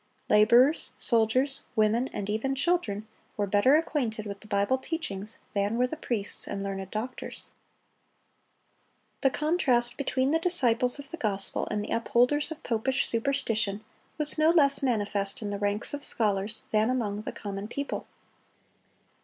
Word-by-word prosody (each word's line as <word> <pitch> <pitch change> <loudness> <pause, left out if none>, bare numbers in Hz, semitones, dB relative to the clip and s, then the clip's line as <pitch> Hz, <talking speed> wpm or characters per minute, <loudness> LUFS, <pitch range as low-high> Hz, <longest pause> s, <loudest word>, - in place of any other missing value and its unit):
Laborers, 240 +8 +5
soldiers, 255 +4 +2
women, 220 +3 +2
and 200 - -4
even 220 +6 -1
children, 265 - 0 0.3
were 205 - +1
better 205 +8 +4
acquainted 245 -9 -1
with 200 -1 -6
the 215 - -14
Bible 205 +6 +1
teachings 220 - -4 0.2
than 205 +3 0
were 250 - +3
the 250 - -4
priests 230 -9 -3
and 195 - -4
learned 195 -1 -4
doctors. 225 +5 -6 1.7
The 270 - +3
contrast 265 -6 +1
between 265 -1 0
the 325 - +2
disciples 250 -9 +2
of 280 -1 -10
the 335 - -6
gospel 200 -7 -1
and 210 -1 -2
the - - -1
upholders 245 +6 +2
of 320 - -8
popish 255 +4 0
superstition 225 -4 0 0.3
was 300 0 -1
no 310 +1 +5
less 285 -5 +5
manifest 205 -5 0
in 205 - -3
the 200 - -4
ranks 205 +4 -1
of 290 0 -4
scholars 210 -1 0
than 215 +2 +2
among 225 -6 -1
the 215 - -5
common 200 0 -6
people. 280 +5 -4
230 Hz, 150 wpm, -28 LUFS, 205-275 Hz, 1.7 s, Laborers